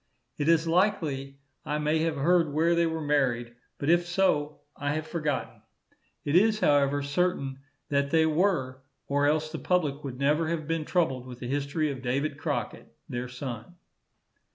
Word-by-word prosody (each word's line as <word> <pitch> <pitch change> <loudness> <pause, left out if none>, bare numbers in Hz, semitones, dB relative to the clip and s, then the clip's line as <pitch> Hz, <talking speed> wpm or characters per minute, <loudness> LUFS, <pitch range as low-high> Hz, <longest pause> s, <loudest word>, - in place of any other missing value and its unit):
It 145 +2 +1
is 165 0 +4
likely 160 -7 0 0.3
I 150 - -2
may 150 +1 +1
have 160 0 0
heard 165 +2 +3
where 165 +4 +2
they 170 0 +3
were 160 -1 -3
married, 125 -5 +1 0.2
but 140 - -4
if 175 0 +3
so, 165 -5 +1
I 145 0 -2
have 155 0 -3
forgotten. 155 -3 -3 0.6
It 145 - 0
is, 215 +3 +4
however, 145 -4 +3
certain 140 -3 -1 0.3
that 140 -1 +1
they 160 0 +4
were, 155 -6 +1 0.2
or 145 +1 +1
else 155 +1 +1
the 160 - -5
public 150 -6 0
would 130 -3 -5
never 150 +4 +2
have 160 -2 -2
been 165 -1 -1
troubled 135 -9 0
with 125 -1 -8
the 125 - -6
history 145 +3 -1
of 130 -2 -7
David 140 +3 -1
Crockett, - - -3 0.2
their 120 +1 -3
son. 125 +3 -7
150 Hz, 170 wpm, -28 LUFS, 140-165 Hz, 0.6 s, is